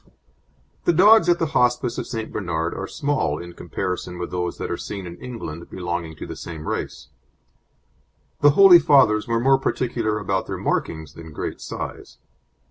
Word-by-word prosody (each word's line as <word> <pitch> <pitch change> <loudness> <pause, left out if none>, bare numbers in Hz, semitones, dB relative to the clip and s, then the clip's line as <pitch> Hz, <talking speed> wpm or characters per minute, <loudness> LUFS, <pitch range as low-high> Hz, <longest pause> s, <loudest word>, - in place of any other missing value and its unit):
The 175 - +4
dogs 210 +4 +6
at 175 - +4
the 165 - 0
Hospice 125 -2 +1
of - - -5
St. 115 -2 -5
Bernard 85 -4 -2
are 95 - -5
small 140 - -1
in 85 +1 -9
comparison 90 -1 -4
with 90 0 -5
those 90 -1 -3
that - - -4
are - - 0
seen 100 -2 -6
in 85 -1 -8
England 85 -10 -7
belonging 85 -3 -4
to - - -8
the - - -7
same 80 -2 -8
race. 70 -1 -4 1.3
The 145 - +6
Holy 195 -3 +9
Fathers 130 -8 +4
were 115 0 +1
more 135 +2 +4
particular 115 -5 -1
about 95 -2 -2
their - - -4
markings 80 -2 -2
than 80 -1 -11
great - - -5
size. - - -7
100 Hz, 170 wpm, -23 LUFS, 85-130 Hz, 1.3 s, Holy